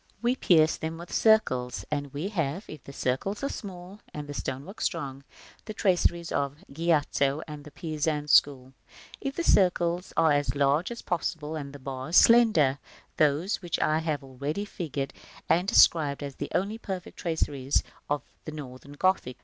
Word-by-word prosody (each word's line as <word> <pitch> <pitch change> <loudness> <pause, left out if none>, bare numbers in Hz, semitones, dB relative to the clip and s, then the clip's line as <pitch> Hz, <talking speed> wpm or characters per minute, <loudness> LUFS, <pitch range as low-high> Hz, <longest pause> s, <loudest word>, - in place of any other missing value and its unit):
We 240 +2 +1
pierce 160 -9 +4
them 160 0 -4
with 170 +1 -9
circles; 130 - +2
and 145 -2 -2
we 150 +8 -3
have, 170 -1 -2
if 155 -4 -10
the - - -9
circles 140 - -2
are 275 - 0
small 190 -1 -8 0.2
and 150 -1 -5
the 145 - -6
stonework 140 - -5
strong, 140 -6 -3 0.4
the 215 - -7
traceries 175 -4 +1
of 140 0 -1 0.2
Giotto 150 -2 +1
and 150 -1 -8
the 150 - -11
Pisan 150 -1 -2
school; 135 -3 +3 0.5
if 275 -1 -3
the 340 - -1
circles 180 - +2
are 160 -1 +5
as 145 -4 +1
large 145 +4 +2
as 235 -1 -7
possible 160 -3 -2
and 140 -3 -5
the 145 - -9
bars 135 +4 -5
slender, 215 - +6 0.4
those 155 +7 +2
which 175 -3 -2
I 155 +1 +2
have 155 -3 -2
already 140 +9 -4
figured 145 -8 -4 0.3
and 180 +3 +2
described 150 -7 +4
as 140 -1 -5
the - - -5
only 205 +5 -1
perfect 190 -4 -6
traceries 145 -5 0 0.3
of 145 -2 0 0.2
the 155 - -5
Northern 140 -2 -9
Gothic. 145 -6 0
155 Hz, 165 wpm, -27 LUFS, 140-180 Hz, 0.5 s, slender